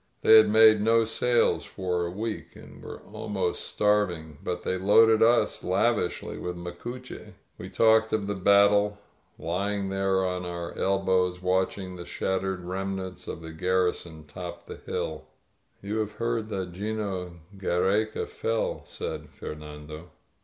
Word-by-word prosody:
They 110 - +9
had 110 -1 +6
made 110 0 +7
no 115 +1 +4
sales 120 +2 +2
for 90 -2 -2
a - - -4
week, 105 +4 -5
and - - -13
were - - -9
ahnost 95 -4 -2
starving, 90 -8 0
but 90 0 -3
they - - -1
loaded 110 +3 +5
us 120 +2 +3
lavishly 100 +1 0
*'with 90 0 -4
Tnacuche. 100 +9 -8 0.3
We - - -7
talked 110 0 +4
of 110 -2 0
the 105 - -2
battle, 100 +1 +4 0.4
lying 100 +3 -2
there 95 -1 +1
on 90 0 -2
• - - -6
our 85 -1 -6
elbows 95 -2 +1
watching 95 0 -1
the 85 - -8
shattered 95 +1 -2
remnants 95 0 -5
of - - -6
the 80 0 -8
garrison 90 -2 -1
top 85 +3 -8
the - - -9
hill. 80 -1 -4 0.6
You 105 +2 -2
have 105 -1 -2
heard 115 0 -2
that 95 -4 -4
'Gino 95 -2 -4 0.2
Giiereca 95 +3 0
fell," 115 0 -2
said - - -6
Fer - - -7
nando. 75 +2 -10
95 Hz, 145 wpm, -27 LUFS, 90-105 Hz, 0.6 s, They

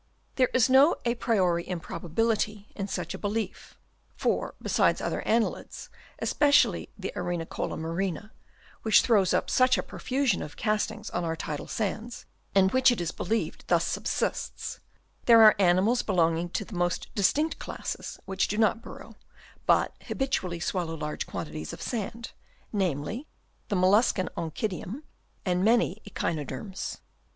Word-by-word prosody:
There 255 -2 +3
is 250 -3 +4
no 270 +5 +6
a 235 - +2
priori 185 -8 +1
improbability 205 +5 -1
in 195 -1 -3
such - - -4
a - - -7
belief, 215 +1 -4 0.4
for - - -1
besides - - +2
other - - -2
annelids, 225 0 -1 0.3
especially 290 -1 +3
the - - -5
Arenicola 175 -2 -3
marina, 175 +5 -3 0.5
which 220 - +5
throws 200 -6 +3
up - - +1
such 255 0 +4
a - - -1
profusion 260 -5 -1
of 150 - -8
castings 215 0 -1
on 175 - -2
our 165 -1 -1
tidal 150 -2 -5
sands, 220 +3 -3 0.3
and 190 -1 +5
which 260 0 +5
it 240 - -1
is 170 -1 -1
believed 225 +5 -2
thus - - +3
subsists, - - -2 0.5
there 230 -2 +8
are 215 - +9
animals 195 +6 +4
belonging 170 -3 +1
to - - -3
the 230 - -12
most 175 -1 -1
distinct 295 - +1
classes, - - -5
which 190 0 0
do 210 - -2
not 225 +1 +3
burrow, - - -11 0.5
but - - +3
habitually 190 -11 -1
swallow 175 -2 -2
large 150 -1 -4
quantities 75 0 -5
of - - -8
sand; 230 0 -4 0.4
namely, 190 - -1 0.4
the 205 - -1
mollus 195 +6 +5
can 185 -2 -2
Onchidium 185 - -4 0.4
and 180 -1 +1
many 220 -2 +3
Echinoderms. 165 +2 -4
200 Hz, 145 wpm, -28 LUFS, 175-230 Hz, 0.5 s, are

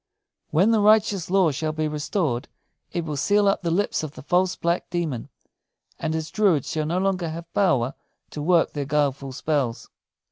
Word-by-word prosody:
When 185 +9 +3
the 225 - +3
righteous 210 -4 +3
law 185 -4 +4
shall 155 +3 -2
be 155 0 -1
restored, 150 -3 -2 0.4
it 170 -2 -2
will 150 -2 -3
seal 205 +8 +3
up 195 - +2
the 170 - -1
lips 190 +5 0
of 155 -2 -6
the - - -11
false 180 +4 +2
black 170 +1 -1
demon; 160 -9 -3 0.7
and 160 - -2
his 160 -1 -4
druids 190 - +2
shall 155 -1 -1
no 170 +3 0
longer 185 -3 0
have 165 +1 -8
power 135 -10 +2 0.4
to 150 - -5
work 170 +2 +3
their 145 -2 -3
guileful 140 -2 0
spells." 140 -3 -2
160 Hz, 180 wpm, -24 LUFS, 150-185 Hz, 0.7 s, law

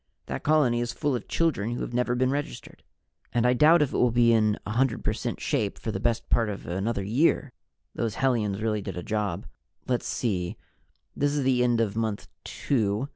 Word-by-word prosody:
That - - -4
colony 145 -6 +3
is 120 0 -2
full 145 -1 -1
of 120 - -5
children 125 -9 0
who - - -4
have - - -4
never 125 0 +1
been 130 +1 +1
registered. 145 +1 -5 0.5
And 120 0 +2
I 125 - +5
doubt 155 +5 +6
if 145 - -3
it - - 0
will 125 - +4
be 120 0 +4
in 110 -2 +3
100 120 +3 0
per 105 - +1
cent 115 +1 -4
shape 110 -9 -1
for 110 - -4
the 95 - -3
best 115 +2 0
part 115 -2 +2
of 100 - -6
another 100 +4 -2
year. 130 +6 +1 0.4
Those 115 -2 -2
hellions 110 -6 0
really 105 -2 0
did 95 - -6
a 90 - -4
job. 105 -4 -2 0.4
Let's 125 -1 -1
see 90 -7 -2 0.6
this 145 0 +1
is 145 - 0
the 130 -1 +3
end 120 -1 +2
of 110 -3 0
Month 110 -3 -2
Two. 110 0 -1
120 Hz, 205 wpm, -26 LUFS, 105-130 Hz, 0.6 s, doubt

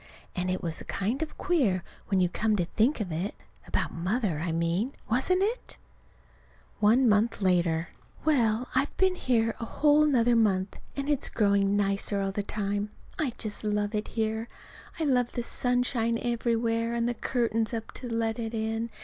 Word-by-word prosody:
And 180 0 -1
it 185 - -2
was 165 -2 -4
kind 215 +9 -1
of 320 - -4
queer, 245 - +1 0.2
when 195 -2 +2
you 180 - +4
come 215 +5 0
to 180 -4 +1
think 225 - +1
of 185 -5 -3
it 175 +6 -3 0.3
about - - -1
Mother, 180 -1 -1
I 165 +1 -2
mean, 170 +10 0
wasn't 365 - +2
it? 455 +5 -3 1.0
One 230 +5 +5
month 215 +2 +3
later. 175 -3 +1 0.4
Well, 245 -6 +2
I've 270 +3 0
been 380 -1 +3
here 230 -9 +1
another - - -4
whole 300 0 +5
month, 230 -7 +2 0.2
and 275 0 -3
it's 295 -3 +1
growing 200 -1 +2
nicer 200 0 +1
all 195 0 -1
the 205 - -2
time. 205 0 -2 0.3
I 280 -7 0
just 215 -1 -4
love 210 0 0
it 210 0 -1
here. 220 0 -2 0.5
I - - 0
love 250 -5 +2
the 240 - -2
sunshine 245 -2 +1
everywhere, 230 -1 0
and 235 0 +1
the 240 - 0
curtains 230 -2 0
up 225 -1 -4
to 250 - -7
let 230 0 -1
it 225 0 -3
in. 225 +1 -2
225 Hz, 170 wpm, -28 LUFS, 200-245 Hz, 1.0 s, One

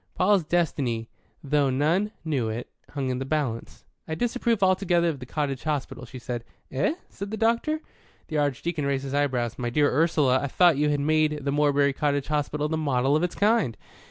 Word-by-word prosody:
Paul's 190 -1 +3
destiny, 140 -9 -1 0.3
though 145 -1 +2
none 160 +10 +1
knew 135 -8 0
it, 115 +3 -5 0.2
hung 135 -3 -3
in 125 - -2
the - - -2
balance. 135 -5 -3 0.2
"I 160 - -2
disapprove 235 0 0
altogether 180 -2 +3
of 150 -4 -4
the 125 - -9
cottage 140 -2 -2
hospital," 145 -4 -3
she 130 - -9
said. 120 -1 -5 0.3
"Eh?" 140 - +1
said 200 +1 -7
the 220 - -4
doctor. 235 +8 +1 0.5
The 155 -2 -1
Archdeacon 145 +2 -1
raised 135 -1 0
his 135 0 -5
eyebrows. 130 -5 0
"My 120 -1 -1
dear 145 +4 +2
Ursula, 145 -4 +3
I 140 - -1
thought 170 +2 +4
you 150 +1 +2
had 145 -1 +1
made 155 -1 +1
the 140 - +1
Morebury 145 -1 +3
Cottage 145 0 -1
Hospital 150 0 0
the 160 +1 -1
model 140 -2 +1
of 155 - +2
its 175 -1 -1
kind." 210 - +2
145 Hz, 190 wpm, -26 LUFS, 135-170 Hz, 0.5 s, thought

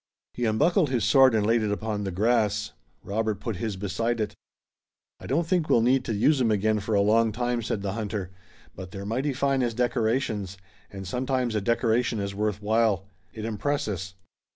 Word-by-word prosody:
He 120 - -2
unbuckled 150 - +2
his 125 -4 0
sword 135 -4 +6
and 105 -2 +2
laid 115 +1 +3
it 105 -1 -1
upon 105 0 -2
the 95 - -2
grass. 105 +1 +1 0.3
Robert 110 0 -2
put 115 -4 -4
his 110 0 -3
beside 105 +5 -2
it. 105 - -2 0.9
"I - - -9
don't 165 +5 +1
think 170 -2 0
we'll 115 - +5
need 130 +2 +3
to 110 - -2
use 135 +7 +3
'em 120 - +3
again 110 +1 +2
for 105 +1 -1
a 100 - +4
long 110 +2 +3
time," 120 +2 -1
said 110 -3 -3
the 100 -1 -2
hunter, 105 -4 -4 0.4
"but 95 -1 -8
they're 100 0 -7
mighty 130 +7 -1
fine 135 0 +1
as 120 -2 -1
decorations, 115 -5 -1 0.3
and 95 -1 -8
sometimes 125 +2 -1
a 105 - 0
decoration 115 +1 +1
is 100 0 -3
worth 105 0 -2
while. 110 -3 +2 0.3
It 110 -1 -6
impresses. 105 - -2
110 Hz, 190 wpm, -26 LUFS, 105-120 Hz, 0.9 s, sword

